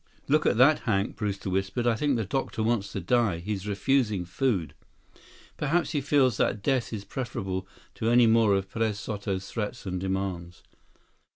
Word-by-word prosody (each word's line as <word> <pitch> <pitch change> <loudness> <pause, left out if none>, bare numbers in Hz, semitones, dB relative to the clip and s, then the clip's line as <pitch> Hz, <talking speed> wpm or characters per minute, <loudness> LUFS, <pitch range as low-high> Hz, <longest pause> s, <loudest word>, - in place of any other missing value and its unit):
"Look 155 +2 +3
at - - +2
that, 145 +5 +6
Hank," 100 -3 -1
Brewster 100 -3 -3
whispered. 95 +5 -1
"I 120 - +4
think 140 +4 +1
the 110 - -1
doctor 120 -1 -2
wants 110 -3 0
to - - -2
die. 110 -1 +1
He's 100 +3 -4
refusing 105 -2 +1
food." 90 - -1 0.8
"Perhaps 150 +1 0
he 150 -3 0
feels 130 -5 +3
that 100 - 0
death 130 -1 0
is 105 -3 -5
preferable 95 -7 -4 0.3
to 110 - -1
any 120 0 +6
more 110 -3 +4
of 95 0 -1
Perez 110 -2 -1
Soto's 100 -2 -4
threats 105 -3 -4
and 90 -1 -3
demands." 95 -2 -3
105 Hz, 170 wpm, -27 LUFS, 95-125 Hz, 0.8 s, that